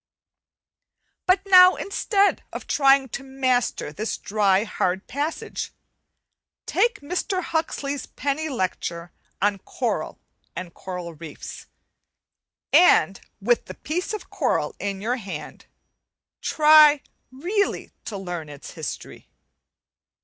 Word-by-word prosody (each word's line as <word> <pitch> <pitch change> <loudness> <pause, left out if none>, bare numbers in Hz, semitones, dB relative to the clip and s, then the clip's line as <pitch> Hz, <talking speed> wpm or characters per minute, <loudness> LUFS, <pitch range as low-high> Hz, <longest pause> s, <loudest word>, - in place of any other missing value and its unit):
But 375 +1 +3
now, 365 -1 +8
instead 400 0 +1
of - - -7
trying 275 -1 +4
to 275 - -5
master 255 - 0
this 215 +5 -3
dry, 200 -1 +2
hard 190 -3 -1
passage, 290 +4 -4 0.9
take 475 -7 +1
Mr. 360 +4 -2
Huxley's 285 -4 -2
penny 290 +3 -2
lecture 175 - -3 0.3
on 205 -1 +2
'Coral - - -3 0.4
and 180 -2 -6
Coral 180 -2 -6
Reefs,' 155 -1 -9 1.1
and 195 - +5 0.2
with 235 +4 +1
the - - -9
piece 355 +8 -3
of 425 -2 -6
coral 280 - 0
in 195 -1 -3
your 240 +4 -1
hand 190 - -8 0.7
try 300 -1 +6 0.3
really 365 +10 -1
to 205 - -5
learn 175 -5 -5
its 145 -1 -10
history. - - -7
260 Hz, 105 wpm, -24 LUFS, 190-315 Hz, 1.1 s, now